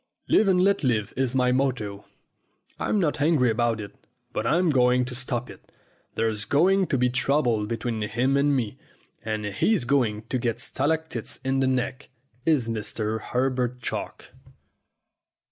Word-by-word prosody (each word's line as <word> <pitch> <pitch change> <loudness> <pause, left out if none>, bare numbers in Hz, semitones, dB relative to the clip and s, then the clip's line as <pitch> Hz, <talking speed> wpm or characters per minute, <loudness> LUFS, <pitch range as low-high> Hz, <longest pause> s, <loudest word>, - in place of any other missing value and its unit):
Live 220 - +4
and 180 -1 +4
let 200 -3 +2
live 110 -5 0
is 130 0 0
my 125 -1 +3
motto. 125 -7 -1 0.7
I'm 210 - 0
not 150 -5 0
angry 145 -6 +3
about 115 0 0
it, 100 -1 -7 0.4
but 110 - -1
I'm 170 +3 +3
going 125 -1 +3
to 125 - -6
stop 125 -1 -2
it. - - -14 0.4
There's 110 -2 0
going 185 - +3
to 135 - 0
be 125 0 +3
trouble 125 -4 +1
between 115 0 -3
him 120 +6 0
and 140 0 +3
me, 115 -6 -2 0.4
and 110 -1 -3
he's 120 - +1
going 120 -5 +1
to 130 - 0
get 120 -1 -1
stalactites 145 -1 -2
in 135 0 +1
the 135 - +2
neck, 130 +1 -2 0.4
is 145 -8 +3
Mr. 110 0 -3
Herbert 125 0 -1
Chalk." 115 - -5
125 Hz, 155 wpm, -25 LUFS, 115-140 Hz, 0.7 s, Live